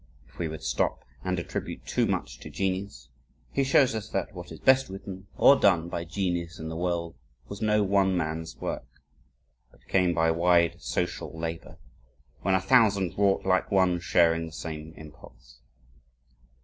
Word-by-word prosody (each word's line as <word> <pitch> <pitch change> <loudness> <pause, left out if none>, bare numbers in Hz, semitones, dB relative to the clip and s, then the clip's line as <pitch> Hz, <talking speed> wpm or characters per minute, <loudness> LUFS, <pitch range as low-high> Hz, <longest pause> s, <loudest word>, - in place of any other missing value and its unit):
If 65 - -21
we 85 - -1
would 80 0 -7
stop - - -1 0.2
and 95 0 -1
attribute 90 - -5
too - - +1
much - - -3
to - - -9
genius, 95 -10 -3 0.4
he 140 - +1
shows 135 -1 +4
us 110 -1 -5
that - - -3
"what 90 -1 -9
is 80 - -9
best 130 -2 +4
written 95 0 -8
or 140 - +7
done 85 -8 +3
by 85 0 -4
genius 85 -1 -2
in 80 0 -6
the 80 - -5
world, 85 -1 -2 0.3
was 100 - -8
no 105 -1 +3
one 95 -1 +2
man's 80 -1 -3
work, - - -5 0.8
but - - -26
came 90 -3 +2
by 80 0 +3
wide 85 0 +3
social 80 - -3
labor, 80 0 -5 0.6
when 95 +1 +2
a - - +3
thousand 100 -4 +3
wrought 100 -1 +2
like 95 -1 +2
one, 95 -3 +3
sharing 85 -1 +2
the - - -10
same 80 0 -7
impulse." 75 -4 -15
90 Hz, 165 wpm, -27 LUFS, 80-95 Hz, 0.8 s, or